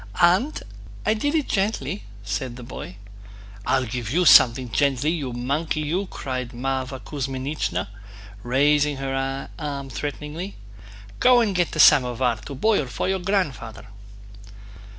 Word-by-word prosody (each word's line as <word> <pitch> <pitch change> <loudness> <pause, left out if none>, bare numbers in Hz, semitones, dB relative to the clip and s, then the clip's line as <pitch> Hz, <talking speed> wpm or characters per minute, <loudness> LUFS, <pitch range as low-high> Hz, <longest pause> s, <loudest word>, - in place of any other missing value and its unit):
"Aunt, 185 - +3 0.4
I 215 - +3
did 290 +8 -1
it 305 -3 +1
gently," 195 -4 -1 0.2
said 115 +5 -3
the 125 - -9
boy. 120 -6 -8 0.7
"I'll 130 -1 +2
give 120 -2 -4
you 175 +8 +2
something 125 -3 +6
gently, 140 +3 +1
you 145 -7 -3
monkey 140 +6 -2
you!" 175 +6 -1
cried 130 -5 -5
Mávra 130 +1 -3
Kuzmínichna, 135 - -3 0.5
raising 145 +4 +2
her 135 0 -3
arm 140 -3 -5
threateningly. 150 - -5 0.6
"Go 250 -1 +6
and 220 -4 +1
get 175 -2 0
the - - -4
samovar 125 -4 +5
to 140 - -9
boil 200 - +2
for 115 - -3
your 190 0 0
grandfather." 165 - -2
140 Hz, 130 wpm, -23 LUFS, 125-175 Hz, 0.7 s, something